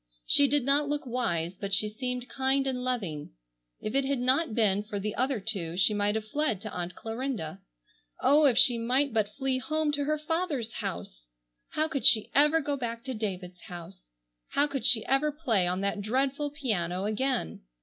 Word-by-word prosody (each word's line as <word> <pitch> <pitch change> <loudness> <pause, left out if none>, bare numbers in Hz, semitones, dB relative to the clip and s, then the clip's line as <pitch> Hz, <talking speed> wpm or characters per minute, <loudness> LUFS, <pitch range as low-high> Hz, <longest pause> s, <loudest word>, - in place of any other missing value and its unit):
She 285 - +6
did 285 0 +2
not 285 +1 +2
look 295 -1 -2
wise, 180 -9 -1
but 195 +1 -1
she 210 - +2
seemed 250 +3 -4
kind 270 +1 0
and 255 -2 -2
loving. 190 - -3 0.5
If 215 - -5
it 275 +1 +3
had 275 +1 0
not 255 +1 +1
been 205 -3 +3
for 210 -1 -5
the 210 +1 -3
other 260 0 0
two 190 -5 -3
she 195 +3 +4
might 205 0 +1
have 220 -1 -3
fled 290 -5 -1
to 215 -2 -6
Aunt 175 0 -5
Clarinda. 225 - -5 0.6
Oh, 295 +2 +5
if 245 -4 +2
she 240 -2 +5
might 255 +3 +1
but 210 -2 0
flee 265 -2 0
home 310 +2 -1
to 290 -1 -1
her 305 +1 0
father's 305 -7 -2
house! - - -6 0.5
How 310 +1 +1
could 275 -7 +1
she 220 -2 +6
ever 300 +3 +5
go 285 0 -2
back 235 -3 -4
to 265 - -4
David's 185 -5 -5
house! 175 0 -11 0.4
How 285 - +2
could 275 -3 -4
she 225 -2 +3
ever 275 +3 +2
play 240 - 0
on 180 +2 -1
that 200 +1 -1
dreadful 270 +6 0
piano 195 - -2
again? 215 - -2
240 Hz, 190 wpm, -28 LUFS, 205-275 Hz, 0.6 s, She